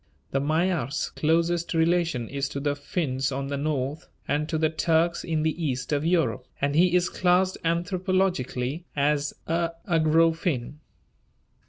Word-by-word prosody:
The 135 - +1
Magyar's 155 -2 0
closest 170 +2 +1
relation 165 -7 +1
is 140 +2 -3
to 140 - -4
the 145 0 0
Finns 140 -3 -2
on 135 +1 -3
the 140 - -2
north 145 +1 -2 0.2
and 150 +2 0
to 160 - 0
the 155 0 +1
Turks 165 +1 +1
in 160 -2 -1
the 160 +2 -1
east 130 -3 -2
of 145 0 +1
Europe, 165 -7 +1
and 140 0 0
he 175 +3 +4
is 180 0 +3
classed 185 +1 +2
anthropologically 175 -5 0
as 145 0 +1
a 165 0 0
Ugro 165 -1 +3
Finn. 150 -4 -3
160 Hz, 150 wpm, -26 LUFS, 140-170 Hz, 0.2 s, he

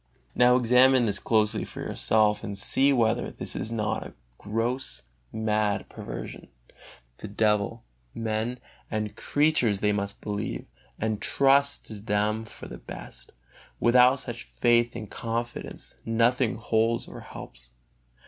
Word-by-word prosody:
Now 125 0 +5
examine 125 +1 +5
this 100 -2 0
closely 110 -2 +1
for - - -9
yourself 105 -1 +2
and 100 -1 -5
see 135 +7 +4
whether 115 -5 +2
this - - -6
is 115 - -3
not 105 -2 -1
a - - -11 0.2
gross, 115 +5 -2 0.3
mad 105 -2 0
perversion: - - -7 0.7
the - - -6
devil, 105 0 0 0.3
men 115 +2 -2 0.3
and 105 -1 -3
creatures 145 -9 +2
they 105 0 +2
must 100 -1 -3
believe, 105 - -4 0.3
and 110 -1 -2
trust 140 +1 +3
to 110 - -8
them 105 +1 0
for - - -11
the - - -9
best; - - -10 0.5
without 125 +2 +6
such 120 -3 -6
faith 120 -1 +2
and 105 - -7
confidence 120 +1 -5
nothing 115 +1 +2
holds 115 +1 0
or - - -9
helps. - - -10
110 Hz, 130 wpm, -27 LUFS, 105-120 Hz, 0.7 s, without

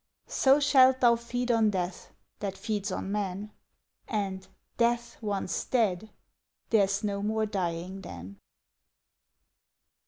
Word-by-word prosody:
So 270 +2 +4
shalt 265 -3 +5
thou 240 -2 +6
feed 245 +1 -2
on 225 -2 +4
Death, 180 -2 -3 0.3
that 195 -2 -4
feeds 205 0 -2
on 190 +1 -3
men, 205 0 -3 0.6
And, 195 -3 -3 0.3
Death 235 0 0
once 200 -4 -2
dead, 220 -4 0 0.6
there's 200 -2 +3
no 200 -1 -1
more 220 +1 0
dying 185 -1 -3
then. 95 - -9
210 Hz, 115 wpm, -29 LUFS, 190-235 Hz, 0.6 s, thou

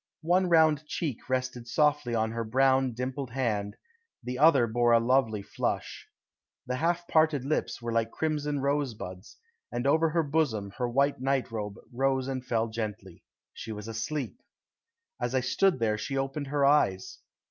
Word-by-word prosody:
One 180 +2 +2
round 155 -2 +4
cheek 145 -8 -4
rested 130 -2 -2
softly 150 -3 +1
on 110 0 0
her 115 0 -3
brown, 130 +2 +2
dimpled 130 +2 -4
hand, 110 -5 -2 0.5
the 125 +1 -4
other 145 -5 +6
bore 120 +1 +2
a 115 - +6
lovely 115 -4 +1
flush. 105 - -3 0.6
The 125 0 -2
half 175 +3 0
parted 155 -4 +2
lips 145 -4 -2
were 115 - -2
like 115 0 +1
crimson 150 0 -2
rose 140 -3 0
buds, 95 0 -9 0.3
and 120 +1 -3
over 160 +3 +3
her 165 +1 +1
bosom 140 -10 0
her 125 -1 0
white 140 +3 +1
nightrobe 115 -6 -1 0.2
rose 130 +1 +1
and 130 -2 -3
fell 115 -2 0
gently. 105 -5 -6 0.3
She 110 - -7
was 105 0 -7
asleep. 115 +1 -4 0.8
As 120 +1 -1
I 130 - +3
stood 175 +8 +2
there 110 -3 0
she 135 +4 -3
opened 135 +2 -2
her 140 0 +1
eyes. 100 -10 +2
130 Hz, 160 wpm, -28 LUFS, 115-145 Hz, 0.8 s, other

